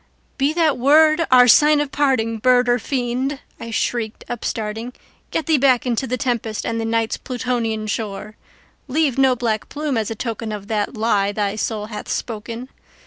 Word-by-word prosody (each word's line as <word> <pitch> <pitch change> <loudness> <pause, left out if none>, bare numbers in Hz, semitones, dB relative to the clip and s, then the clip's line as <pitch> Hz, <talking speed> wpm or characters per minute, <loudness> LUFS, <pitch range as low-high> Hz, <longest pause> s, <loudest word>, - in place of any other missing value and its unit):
"Be 275 +2 +2
that 315 -5 +2
word 310 +4 +5
our 250 -1 +7
sign 300 +5 +6
of 290 -2 -2
parting, 230 -6 +1
bird 250 +1 +4
or 245 0 +3
fiend!" 260 +1 -2 0.2
I 230 - -7
shrieked, 225 -1 -2
upstarting:"Get 230 +6 -5
thee 315 -4 +3
back 260 -2 +3
into 245 +1 -1
the 255 +2 -1
tempest 230 -4 -2
and 230 0 -2
the - - -2
Night's 225 0 0
Plutonian 240 -4 -2
shore! 215 0 -4 0.5
Leave 275 -1 +1
no 265 -1 +4
black 225 -3 -2
plume 290 -5 -2
as 215 - -2
a 225 - -4
token 225 -1 -4
of 205 0 -7
that 215 +2 -2
lie 205 -3 +1
thy 205 0 -1
soul 215 0 -2
hath 210 -1 -8
spoken! 230 +2 -5
235 Hz, 170 wpm, -20 LUFS, 220-265 Hz, 0.5 s, our